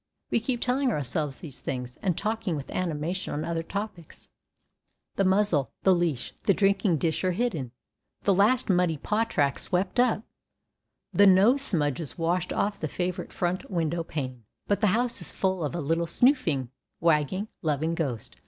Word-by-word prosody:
We - - +3
keep 240 +1 -2
telling 260 +2 +1
ourselves 145 - -2
these 145 -7 -8
things, 125 -2 -4
and 180 -4 -1
talking 215 -4 -1
with 140 -2 -6
animation 170 0 -2
on 150 - -2
other 165 -1 -1
topics. 195 -2 -7 0.9
The 195 - +2
muzzle, 190 -7 +2
the 190 - +6
leash, 170 -7 -1
the 200 - +4
drinking 195 -3 +2
dish 160 +4 0
are 185 -1 +2
hidden, 175 - -1 0.5
the 200 - +4
last 215 +6 +3
muddy 180 -5 +2
paw 215 +9 0
track 140 -11 0
swept 185 +6 0
up, 245 -3 +3 0.9
the 205 - +6
nose 205 +9 +6
smudges 150 - 0
washed 170 +1 0
off 205 +1 -1
the 155 - -2
favorite 180 +3 -3
front 180 +1 -2
window 170 -2 -1
pane. 130 -7 -5 0.2
But 205 +1 0
the 210 - +4
house 235 +5 +1
is - - -2
full 190 -3 0
of 150 +3 -2
a - - -2
little 165 +3 0
snoofing, 160 - +2 0.3
wagging, 165 +5 +1
loving 155 +1 0
ghost. 135 -10 -3
175 Hz, 165 wpm, -27 LUFS, 155-205 Hz, 0.9 s, the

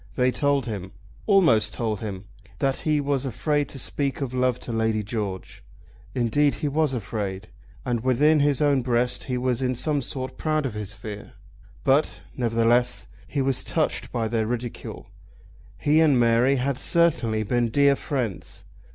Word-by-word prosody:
They 125 0 +3
told 140 -1 +1
him, 100 -5 -6 0.3
almost 175 - +4
told 110 -4 -2
him, 100 -3 -5 0.3
that 135 -1 0
he 155 -1 +1
was 140 -2 0
afraid 145 +3 -1
to - - -8
speak 140 +1 -2
of 135 -3 -3
love 125 -1 +1
to - - -5
Lady 110 -1 0
George. 100 -3 -5 0.5
Indeed 135 +4 +2
he 150 - -3
was 145 -1 +1
afraid, 105 -2 -4 0.4
and 120 -2 0
within 145 +5 +4
his 145 0 +2
own 140 -2 +3
breast 120 0 0
he 125 -2 -2
was 125 0 0
in 130 -1 0
some 145 +3 0
sort 130 0 -5
proud 155 -2 0
of 125 - -3
his 105 -1 -6
fear. 105 0 -8 0.5
But, 135 +3 +2
nevertheless, 115 -2 +2 0.2
he 140 -2 -1
was 135 -1 +1
touched - - -1
by 115 -2 -1
their 110 -1 0
ridicule. 120 0 -5 0.7
He 150 +2 +3
and 150 -6 +4
Mary 120 +3 +4
had 135 0 -1
certainly 145 -11 +2
been 120 +2 0
dear 140 +3 +4
friends. 125 - -4
125 Hz, 160 wpm, -25 LUFS, 115-140 Hz, 0.7 s, almost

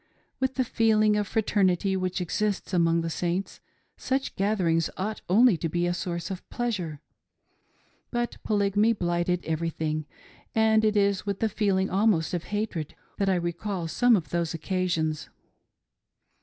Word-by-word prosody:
With 265 0 0
the 260 - +1
feeling 215 -2 +3
of 210 -1 0
fraternity 195 -3 +1
which 185 0 -1
exists 200 +3 -2
among 170 -1 +3
the 165 - -2
Saints, 175 +4 -2 0.4
such 265 +1 -2
gatherings 185 -5 +1
ought 210 +3 -3
only 215 +1 +5
to 165 - -2
be 175 +2 0
a 175 - +1
source 170 +1 -4
of 185 - -5
pleasure; 195 - -3 1.1
but 240 -1 -2
Polygamy 205 +1 +2
blighted 175 -2 -1
everything, 160 -1 -2 0.5
and 220 0 +4
it 215 -1 +2
is 200 0 +1
with 200 +2 0
feelings 190 -2 +1
almost 195 -4 +2
of 175 -2 -2
hatred 205 -7 -3 0.2
that 195 -1 +2
I 190 - +3
re 175 -1 0
call 185 -2 -4
some 245 +8 +4
of 160 -9 -3
those 170 -1 -1
occasions. 165 -3 -1
190 Hz, 145 wpm, -27 LUFS, 170-215 Hz, 1.1 s, only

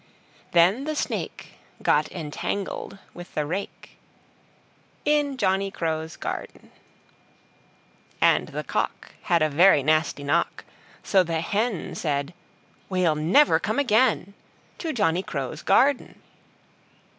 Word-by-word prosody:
Then 185 +10 +4
the 310 0 -2
Snake - - -4 0.2
Got - - +2
entangled 185 +5 -4 0.2
with 175 0 -11
the 150 - 0
rake 185 +6 -6 1.1
In 295 -2 +1
Johnny 195 -2 +1
Crow's 160 -3 -3
Garden. - - -7 1.5
And - - +3
the - - -5
Cock - - -3
Had 170 -4 +2
a - - +4
very 150 0 +5
nasty 155 -1 +1
knock; 140 0 0 0.4
So 190 - +4
the 165 -2 -1
Hen 210 +2 -2
Said: 145 0 -2 0.6
"We'll 185 -4 +2
never 160 - +4
come 215 +6 -2
again 240 -6 +2 0.5
To 330 - -2
Johnny 185 - +1
Crow's 140 -8 -5
Garden!" 280 0 +2
180 Hz, 110 wpm, -25 LUFS, 160-215 Hz, 1.5 s, very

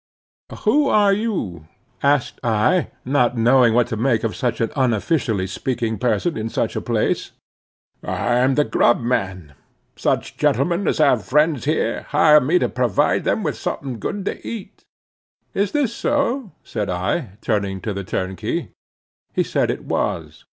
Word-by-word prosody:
"Who 275 +6 +3
are 205 -2 +4
you?" 175 - -3 0.3
asked 140 -2 +1
I, 115 +9 +2 0.2
not 125 -2 +2
knowing 120 0 +4
what 120 -1 +4
to 115 - -2
make 115 0 +1
of 115 -2 -1
such 125 -4 -1
an 115 - 0
unofficially 120 - +1
speaking 115 +2 -3
person 125 - 0
in 110 +1 -3
such - - -2
a - - -2
place. - - -1 0.7
"I 120 - -1
am 130 +2 +3
the 150 - +4
grub 120 - +3
man. 95 - -2 0.4
Such - - -1
gentlemen 170 - +1
as - - +1
have 140 -8 +3
friends 150 -2 +2
here, 155 +2 -1
hire 150 -1 +6
me 155 +8 +2
to - - +2
provide 125 -6 +1
them - - +1
with - - -1
something 130 -5 -4
good 195 - -4
to - - -3
eat." 220 -3 -8 0.7
"Is 200 0 0
this 275 -6 0
so?" 270 -5 -1
said 105 - -3
I, 95 - -2
turning 100 -3 -1
to 110 - -3
the 100 0 -4
turnkey. 95 0 -3 0.6
He - - +3
said - - 0
it - - -3
was. - - -3
125 Hz, 160 wpm, -21 LUFS, 110-165 Hz, 0.7 s, hire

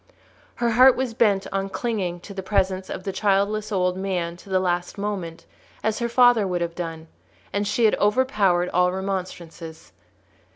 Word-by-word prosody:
Her 235 -1 0
heart 255 +3 +7
was 255 -3 -2
bent 205 -4 +2
on 195 0 -2
clinging 195 -6 -3
to 200 - -10
the 195 - -5
presence 190 -1 0
of - - -6
the 195 - -3
childless 205 +2 0
old 180 -2 0
man 180 -3 -2
to 195 - -16
the 190 -1 +2
last 175 +1 -2
moment, 185 -5 -4 0.4
as 220 0 0
her 235 0 -1
father 240 -4 +5
would 180 -1 -2
have 170 -1 -2
done; 165 -2 -6 0.5
and 205 0 0
she 235 +2 +2
had 215 - +4
overpowered 205 -6 +2
all 180 +1 +3
remonstrances. 175 - -6
195 Hz, 170 wpm, -23 LUFS, 180-210 Hz, 0.5 s, heart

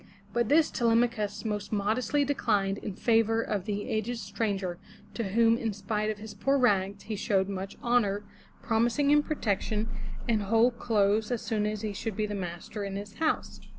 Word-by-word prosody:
But 235 -2 +1
this 310 +1 +4
Te 240 - -3
lem'a 230 +1 +5
chus 210 -2 -4
most 210 -2 -3
modestly 220 +7 +1
declined 205 -8 +1
in 200 - -5
favor 225 0 +3
of 205 -4 -2
the 205 -1 -3
aged 220 +3 -1
stranger, 200 -4 -2 0.3
to 230 - -2
whom 225 +3 +3
in 225 -2 -1
spite 210 +1 -2
of 215 - -2
his 215 +1 -9
poor 275 +1 +1
rags 200 -5 +2
he 215 - -4
showed 195 -2 +1
much 195 0 -5
honor, 210 -4 +2 0.4
promising 240 +5 +2
him 295 0 +6
protection 220 -6 -1 0.4
and 220 -3 +2
whole 225 +4 +4
clothes 215 -2 +1
as 245 -3 -2
soon 215 -1 0
as 215 0 -3
he 210 -2 -2
should 210 0 -4
be 215 - +1
the 210 - -4
master 190 +2 -5
in 195 -1 -4
his 205 +1 -6
house. 320 -1 0
215 Hz, 185 wpm, -29 LUFS, 200-235 Hz, 0.4 s, him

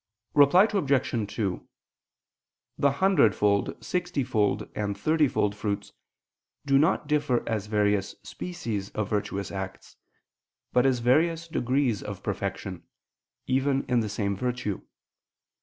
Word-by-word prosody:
Reply 150 +8 +6
Obj. 135 - 0
2: 100 -5 -2 1.1
The 140 - +3
hundredfold, 105 - +2
sixtyfold, 135 - 0
and 100 -1 -2
thirtyfold 135 -4 +2
fruits 100 -1 -4 0.7
do 140 -1 +4
not 155 0 +2
differ 145 -4 0
as 105 -2 -2
various 105 -2 +1
species 115 - -5
of 110 -2 -1
virtuous 100 -1 -2
acts, 95 -1 -7 0.8
but 125 +2 +4
as 125 -3 +1
various 165 +6 +3
degrees 130 -6 0
of 100 -3 -7
perfection, - - -4 0.6
even 135 +1 +1
in 125 -1 +1
the 110 -2 -1
same 100 -1 -1
virtue. 125 -2 -2
120 Hz, 110 wpm, -27 LUFS, 105-145 Hz, 1.1 s, Reply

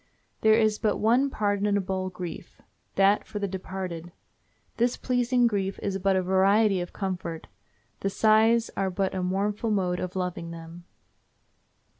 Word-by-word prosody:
There 220 0 +6
is 215 -1 +2
but 215 - +1
one 245 +6 +3
pardonable 200 -4 0
grief—that 190 +2 -2
for - - -6
the 200 -1 -1
departed. 185 -2 -6 0.7
This 240 +1 +1
pleasing 245 -1 +1
grief 195 -4 0
is 195 -1 -2
but 195 0 +2
a 185 - +1
variety 195 +2 +3
of 175 - -6
comfort, 180 -4 -4 0.5
the 195 - -1
sighs 220 +3 +3
are 195 0 0
but 190 +1 -1
a 185 - -2
mournful 200 +4 -1
mode 185 -4 0
of 185 0 -5
loving 180 -2 -3
them. 170 +1 -10
195 Hz, 140 wpm, -27 LUFS, 185-215 Hz, 0.7 s, There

